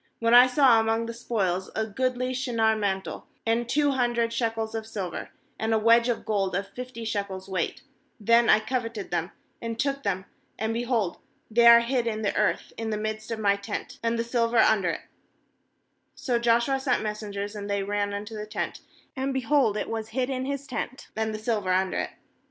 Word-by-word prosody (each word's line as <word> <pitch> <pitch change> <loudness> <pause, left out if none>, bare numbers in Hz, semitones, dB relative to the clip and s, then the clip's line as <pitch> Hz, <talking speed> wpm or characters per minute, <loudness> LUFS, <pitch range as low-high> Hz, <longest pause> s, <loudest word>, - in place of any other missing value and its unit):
a"Wlien 230 0 +2
I 245 +1 +9
saw 255 -3 +5
among 225 +1 +1
the 230 - -5
spoil 200 -6 -1
a 220 - 0
goodly 255 +3 -1
aShinar 235 -4 +1
mantle, 195 -2 -3 0.2
and 230 +1 +1
two 290 +1 +3
hundred 240 -3 +1
shekels 225 -1 -1
of 220 -1 -4
silver, 190 -6 -5 0.3
and 220 0 +1
a - - +4
wedge 230 +2 +5
of 235 - -2
gold 195 -4 0
of 195 +1 -1
fifty 245 +1 -7
shekels 200 -3 -3
weight, 190 -1 -2 0.4
then 230 +2 +4
I 215 - +6
coveted 230 -4 -3
them, 175 0 -1 0.3
and 230 -1 -4
took 275 +1 0
them; 190 -4 -2 0.3
and, 220 +1 -1
behold, 230 -5 0 0.3
they 235 +1 +5
are 235 0 +10
hid 240 0 0
in 220 -1 -2
the 200 - 0
earth 210 - 0
in 225 -1 -3
the 215 - -1
midst 215 0 -4
of 230 - -2
my 200 -2 +3
tent, 200 0 -6
and 230 0 0
the 230 - 0
silver 235 0 0
under 200 -5 +4
it/ - - -3 1.2
^So 240 -3 0
Joshua 235 +3 +3
sent 260 -4 0
messengers, 210 -1 -4
and 205 -1 -6
they 200 -1 0
ran 205 0 -1
unto 205 +2 -5
the 210 0 -5
tent; 215 - -4 0.4
and, 270 0 -1
be 265 0 -1
hold, 255 -5 +2
it - - -2
was 220 -1 -4
hid 255 +1 +1
in 260 0 -2
his 280 0 -3
tent, 255 0 -5
and 220 0 -1
the 215 - -4
silver 215 -4 -1
under 185 0 +1
it. - - -2
225 Hz, 200 wpm, -26 LUFS, 210-240 Hz, 1.2 s, are